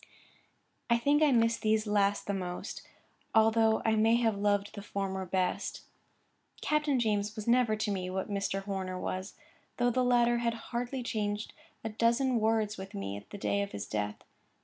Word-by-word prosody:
I 235 Hz, -, +5 dB
think 285 Hz, +5 st, +2 dB
I 300 Hz, -2 st, +5 dB
miss 230 Hz, -2 st, +3 dB
these 215 Hz, 0 st, +1 dB
last 205 Hz, -1 st, +1 dB
the 200 Hz, -, -1 dB
most, 180 Hz, -2 st, -4 dB, 0.5 s
although 220 Hz, 0 st, +4 dB
I 220 Hz, -, +4 dB
may 220 Hz, +1 st, +4 dB
have 230 Hz, -3 st, +2 dB
loved 205 Hz, 0 st, 0 dB
the 200 Hz, -, -7 dB
former 190 Hz, -2 st, -3 dB
best. 185 Hz, 0 st, -1 dB, 0.8 s
Captain 300 Hz, -3 st, +1 dB
James 215 Hz, -1 st, -1 dB
never 235 Hz, -2 st, +4 dB
was 215 Hz, -, -3 dB
to 210 Hz, -, 0 dB
me 185 Hz, -2 st, -2 dB
what 190 Hz, +1 st, -2 dB
Mr. 195 Hz, -1 st, -2 dB
Horner 190 Hz, -2 st, -3 dB
was, 185 Hz, +2 st, -4 dB, 0.4 s
though 245 Hz, 0 st, +2 dB
the 255 Hz, +2 st, +1 dB
latter 240 Hz, -1 st, +3 dB
had 235 Hz, -1 st, 0 dB, 0.2 s
hardly 245 Hz, +2 st, -2 dB
changed 210 Hz, -2 st, -2 dB, 0.3 s
a 225 Hz, -, -2 dB
dozen 235 Hz, +3 st, +2 dB
words 220 Hz, -1 st, +1 dB
with 190 Hz, 0 st, -8 dB
me 100 Hz, 0 st, -4 dB
at 100 Hz, 0 st, -10 dB
the -, -, -7 dB
day 200 Hz, 0 st, 0 dB
of 200 Hz, -, -4 dB
his 100 Hz, -, -4 dB
death. 105 Hz, 0 st, -3 dB
215 Hz, 175 wpm, -31 LUFS, 195-235 Hz, 0.8 s, I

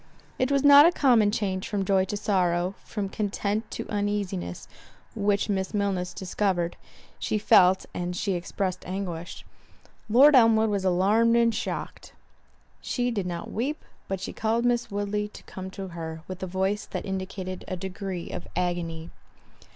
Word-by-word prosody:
It 255 Hz, +2 st, +1 dB
was 280 Hz, -1 st, +2 dB
not 285 Hz, +2 st, +9 dB
a -, -, +4 dB
common 240 Hz, -10 st, +4 dB
change 195 Hz, -3 st, -2 dB
from 200 Hz, -2 st, -1 dB
joy 190 Hz, -1 st, +3 dB
to 205 Hz, +2 st, -4 dB
sorrow, 180 Hz, -3 st, +1 dB
from 205 Hz, -3 st, -4 dB
content 205 Hz, +1 st, -2 dB
to -, -, -6 dB
uneasiness, 205 Hz, -, -3 dB, 0.5 s
which 205 Hz, -2 st, +1 dB
Miss 190 Hz, 0 st, -2 dB
Milner 200 Hz, -3 st, 0 dB
discovered—she 190 Hz, +1 st, -3 dB
felt, 190 Hz, -3 st, +5 dB
and 180 Hz, 0 st, -3 dB
she 195 Hz, +2 st, -1 dB
expressed 185 Hz, +1 st, -3 dB
anguish—Lord 195 Hz, -, 0 dB
Elmwood 225 Hz, -3 st, +5 dB
was 200 Hz, -2 st, -1 dB
alarmed 205 Hz, +6 st, +3 dB
and 235 Hz, -1 st, +4 dB
shocked. -, -, -5 dB, 0.7 s
She 245 Hz, -1 st, -1 dB
did 200 Hz, -5 st, -2 dB
not 170 Hz, -1 st, -5 dB
weep, 275 Hz, +7 st, -3 dB, 0.2 s
but 195 Hz, -1 st, -3 dB
she 190 Hz, -, -5 dB
called 225 Hz, +2 st, 0 dB
Miss 240 Hz, 0 st, +1 dB
Woodley 205 Hz, 0 st, -2 dB
to 210 Hz, -, -13 dB
come 190 Hz, 0 st, -8 dB
to 190 Hz, 0 st, -7 dB
her, 160 Hz, -1 st, -7 dB
with 185 Hz, 0 st, -7 dB
a 190 Hz, -, -3 dB
voice 190 Hz, +3 st, -1 dB
that -, -, -5 dB
indicated 185 Hz, -1 st, -5 dB
a 185 Hz, -, -3 dB
degree 190 Hz, -1 st, -5 dB
of -, -, -6 dB
agony. 170 Hz, -2 st, -2 dB
195 Hz, 150 wpm, -26 LUFS, 185-215 Hz, 0.7 s, not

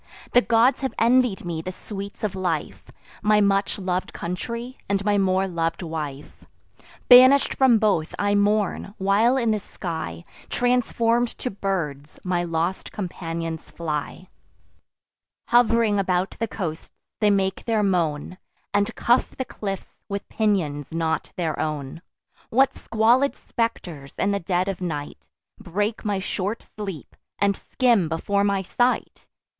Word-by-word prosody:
The 245 Hz, -, +6 dB
gods 240 Hz, +3 st, +3 dB
have 265 Hz, -, -2 dB
envied 235 Hz, -4 st, +3 dB
me 165 Hz, -2 st, -3 dB
the 185 Hz, -, -5 dB
sweets 200 Hz, +2 st, -8 dB
of 210 Hz, -3 st, 0 dB
life, 175 Hz, -5 st, -2 dB, 0.4 s
My 210 Hz, 0 st, +4 dB
much 200 Hz, -1 st, +2 dB
lov'd 185 Hz, -2 st, -2 dB
country, 235 Hz, +8 st, -5 dB
and 200 Hz, 0 st, 0 dB
my 205 Hz, -1 st, +3 dB
more 190 Hz, 0 st, +2 dB
lov'd 165 Hz, 0 st, -2 dB
wife: 150 Hz, -4 st, -6 dB, 0.6 s
Banish'd 260 Hz, +2 st, +8 dB
from 260 Hz, -4 st, +5 dB
both, 200 Hz, -7 st, +1 dB
I 205 Hz, 0 st, +1 dB
mourn; 205 Hz, 0 st, +1 dB
while 210 Hz, +6 st, +3 dB
in 235 Hz, -4 st, +2 dB
the 215 Hz, -, +1 dB
sky, 160 Hz, -, -6 dB, 0.3 s
Transform'd 245 Hz, -1 st, +2 dB
to 250 Hz, -, -3 dB
birds, 165 Hz, -8 st, -3 dB
my 180 Hz, -1 st, 0 dB
lost 170 Hz, +2 st, -2 dB
companions 165 Hz, -4 st, -5 dB
fly: 160 Hz, +2 st, -4 dB, 1.2 s
Hov'ring 230 Hz, -3 st, +4 dB
about 185 Hz, -1 st, 0 dB
the 230 Hz, -, -3 dB
coasts, 165 Hz, -7 st, -5 dB, 0.2 s
they 210 Hz, -1 st, +4 dB
make 195 Hz, -1 st, 0 dB
their 220 Hz, -2 st, +1 dB
moan, 175 Hz, -2 st, 0 dB, 0.3 s
And 205 Hz, 0 st, +1 dB
cuff 240 Hz, +2 st, +2 dB
the 260 Hz, -, -2 dB
cliffs 195 Hz, -5 st, -6 dB
with 200 Hz, 0 st, -4 dB
pinions 175 Hz, -10 st, 0 dB
not 160 Hz, -1 st, -1 dB
their 165 Hz, -3 st, -2 dB
own. 150 Hz, 0 st, -3 dB, 0.5 s
What 265 Hz, +3 st, +3 dB
squalid 235 Hz, +5 st, +2 dB
spectres, 175 Hz, -, -4 dB
in 200 Hz, -, +1 dB
the 200 Hz, -, 0 dB
dead 180 Hz, +1 st, 0 dB
of 195 Hz, -2 st, -3 dB
night, 150 Hz, -5 st, -5 dB, 0.3 s
Break 205 Hz, +5 st, -2 dB
my 205 Hz, -3 st, 0 dB
short 200 Hz, +3 st, -3 dB
sleep, 195 Hz, -8 st, -7 dB, 0.2 s
and 200 Hz, -1 st, +2 dB
skim 230 Hz, -, +1 dB
before 200 Hz, +5 st, 0 dB
my 200 Hz, -1 st, +1 dB
sight! 245 Hz, +7 st, -1 dB
195 Hz, 140 wpm, -24 LUFS, 170-220 Hz, 1.2 s, Banish'd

